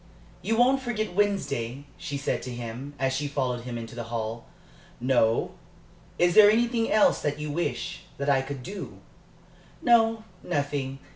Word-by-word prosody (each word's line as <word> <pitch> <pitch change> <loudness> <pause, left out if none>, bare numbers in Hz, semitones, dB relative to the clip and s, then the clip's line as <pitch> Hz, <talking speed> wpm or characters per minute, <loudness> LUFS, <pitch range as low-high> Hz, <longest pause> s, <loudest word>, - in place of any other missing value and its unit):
"You 225 - 0
won't 255 +3 +4
forget 215 -6 -2
Wednesday?" 145 - -1
she 145 - -5
said 140 - -1
to 125 - -6
him, 120 +4 -6
as 135 -1 0
she 145 +2 -1
followed 125 -4 -2
him 120 -1 -4
into 115 -1 -7
the 120 -1 -5
hall. 115 0 -4 0.5
"No. 120 -3 +2 0.7
Is 175 0 +3
there 210 +1 +9
anything 230 +1 +2
else 215 - +4
that 145 0 -1
you 150 0 -3
wish 175 +3 -3
that 140 - -3
I 135 -2 +4
could 135 -1 -6
do?" 200 +8 -7 0.8
"No, 225 -2 +4 0.2
nothing. 140 -2 -2
145 Hz, 155 wpm, -27 LUFS, 125-205 Hz, 0.8 s, there